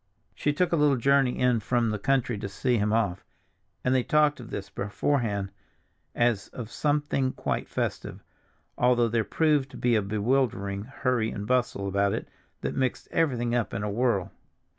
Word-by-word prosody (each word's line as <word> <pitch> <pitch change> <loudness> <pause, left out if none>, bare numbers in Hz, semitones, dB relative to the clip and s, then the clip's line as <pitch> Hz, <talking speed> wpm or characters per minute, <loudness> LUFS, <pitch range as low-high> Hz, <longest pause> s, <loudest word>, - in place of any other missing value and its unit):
She 145 - 0
took 175 +5 0
a - - +3
little 150 -3 +3
journey 135 0 +3
in 125 -2 +3
from 115 +1 0
the 105 - -2
country 130 0 +1
to 100 - -4
see 125 +5 0
him 105 +1 +1
off, 100 -5 0 0.6
and 125 - +2
they 130 - +3
talked 150 +2 +2
of 120 -2 -9
this 100 - -5
beforehand 100 -2 -1 0.6
as 120 -4 +1
of 120 -2 -8
something 145 -3 0
quite - - -3
festive, - - -3 0.6
although 120 -1 +4
there 115 0 +1
proved 150 0 +1
to - - -11
be 120 -1 +2
a 110 - +3
bewildering 105 -1 0
hurry 125 -3 0
and 105 -2 -5
bustle 120 -4 0
about 100 +1 +1
it - - -4 0.3
that - - -2
mixed 130 -2 -1
everything 125 -7 +1
up 120 -2 -1
in 105 - -2
a 105 - -2
whirl. 115 -4 0
120 Hz, 175 wpm, -27 LUFS, 105-135 Hz, 0.6 s, although